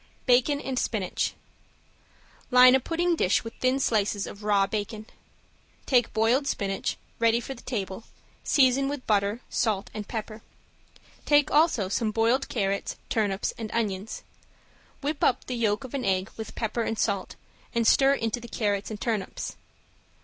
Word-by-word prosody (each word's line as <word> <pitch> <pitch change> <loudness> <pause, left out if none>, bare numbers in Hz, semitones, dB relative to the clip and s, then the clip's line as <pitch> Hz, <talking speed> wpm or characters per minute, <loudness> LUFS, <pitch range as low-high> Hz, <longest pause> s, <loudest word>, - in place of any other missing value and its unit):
~BACON 255 +3 +3
AND 265 -3 -2
SPINACH~ 200 -5 -1 1.1
Line 250 0 +8
a 265 - +5
pudding 340 +5 0
dish 185 - +2
with 230 - -7
thin 255 +1 +2
slices 210 -5 +1
of 200 - -9
raw 205 -2 +3
bacon. 210 +2 -4 0.8
Take 245 -4 +3
boiled 230 +6 +2
spinach, 195 -5 -2 0.2
ready 230 0 +3
for 270 - -6
the 240 - -13
table, 200 -3 -4 0.4
season 270 0 +3
with 285 -2 -5
butter, 205 +2 +1
salt 215 -4 -1
and 210 -1 -6
pepper. 220 -1 -5 0.8
Take 290 0 +4
also 295 - +3
some 215 +3 0
boiled 230 +5 +1
carrots, 200 -3 -1
turnips 205 -3 0
and 220 -1 -4
onions. 210 -2 -2 0.8
Whip 290 +1 -2
up 255 - +2
the 255 - -4
yolk 225 -1 0
of 260 - -9
an 275 -2 -2
egg 190 0 0
with 220 - -7
pepper 230 +1 -2
and 225 -1 -2
salt, 200 -4 -1 0.4
and 230 -1 +2
stir 270 +4 +5
into 225 -2 -2
the 235 - -10
carrots 205 -3 -1
and 215 -2 -6
turnips. 220 -5 -3
225 Hz, 155 wpm, -27 LUFS, 205-255 Hz, 1.1 s, Line